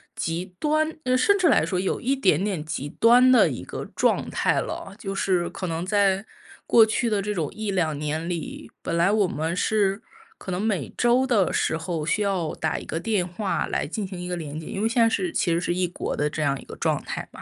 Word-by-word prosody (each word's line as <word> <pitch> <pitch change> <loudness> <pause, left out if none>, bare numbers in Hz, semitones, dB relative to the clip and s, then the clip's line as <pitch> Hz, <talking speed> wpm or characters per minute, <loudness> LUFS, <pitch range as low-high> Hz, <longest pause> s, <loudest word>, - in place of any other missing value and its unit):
极 165 +2 -2
端 310 +1 +1
嗯， 255 0 +2
甚 405 +10 +4
至 355 -4 +3
来 - - +4
说 185 - -2
有 190 - -1
一 270 +3 0
点 185 - +2
点 195 -7 -2
极 145 -2 -4
端 245 - +5
的 255 - +6
一 - - -5
个 - - -6
状 - - +1
态 - - +1
了。 195 - -6
就 195 -2 -5
是 180 -3 0
可 185 +1 -5
能 165 +2 -3
在 195 0 +2 0.4
过 225 -2 +6
去 225 +1 0
的 205 -2 +1
这 210 +1 -2
种 160 -6 -2
1-2 185 -8 -1
年 155 +3 -3
里， 170 -3 -5
本 170 - -2
来 170 +4 +3
我 210 -3 +3
们 160 +1 -2
是 200 +1 +1 0.4
可 - - -10
能 180 +2 -1
每 200 -9 -1
周 245 +2 +3
的 205 -8 +2
时 160 - 0
候， 165 -2 -3
需 210 +6 0
要 190 -5 -1
打 160 - -1
一 - - -10
个 165 - -4
电 200 -5 0
话 190 +2 -2
来 - - -1
进 195 +5 -4
行 185 -2 -8
一 180 0 -6
个 180 - -2
连 155 -2 -6
接。 160 - -7
因 195 - -4
为 220 - +2
现 235 0 +3
在 225 - +5
是 360 +6 -1
其 170 - +1
实 165 - +2
是 175 0 -1
异 185 0 +1
国 - - -4
的 150 0 0
这 155 - -4
样 140 -2 +1
一 - - -12
个 - - -10
状 - - 0
态 - - -5
嘛。 - - -10
190 Hz, 260 characters per minute, -24 LUFS, 165-220 Hz, 0.4 s, 的